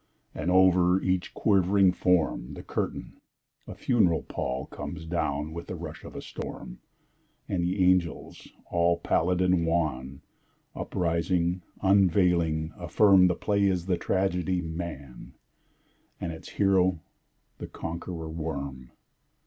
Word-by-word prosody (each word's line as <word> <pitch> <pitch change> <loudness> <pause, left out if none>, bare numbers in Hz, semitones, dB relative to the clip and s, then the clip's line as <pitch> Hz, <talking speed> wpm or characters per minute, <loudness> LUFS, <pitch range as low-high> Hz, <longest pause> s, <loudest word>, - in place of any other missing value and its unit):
And, - - -3
over 90 0 +5
each 95 -1 -1
quivering 95 -2 +3
form, 90 -8 0
The - - -9
curtain, - - -4 0.5
a - - -8
funeral 100 -10 +2
pall, 65 +1 -4
Comes 80 - -7
down 75 -2 -2
with 85 +1 -7
the 90 - -5
rush 80 -2 -8
of - - -11
a - - -6
storm - - -8 0.7
And 90 -2 -1
the 90 +2 +1
angels, 90 -2 0 0.2
all 85 0 +2
pallid 90 +1 +1
and 90 -2 +3
wan, 75 -5 -1 0.5
Uprising, 85 +1 -1 0.2
unveiling, 90 -5 +3
affirm 95 -3 +5
That 90 - +1
the - - -21
play 100 -1 +2
is 90 -3 +1
the 95 -1 +1
tragedy, 90 0 0
"Man," 80 -6 -7 0.8
And 85 - -3
its 80 - -9
hero 95 -3 +2 0.6
the - - -6
Conqueror 85 0 -6
Worm. 70 -6 -5
85 Hz, 125 wpm, -27 LUFS, 80-95 Hz, 0.8 s, over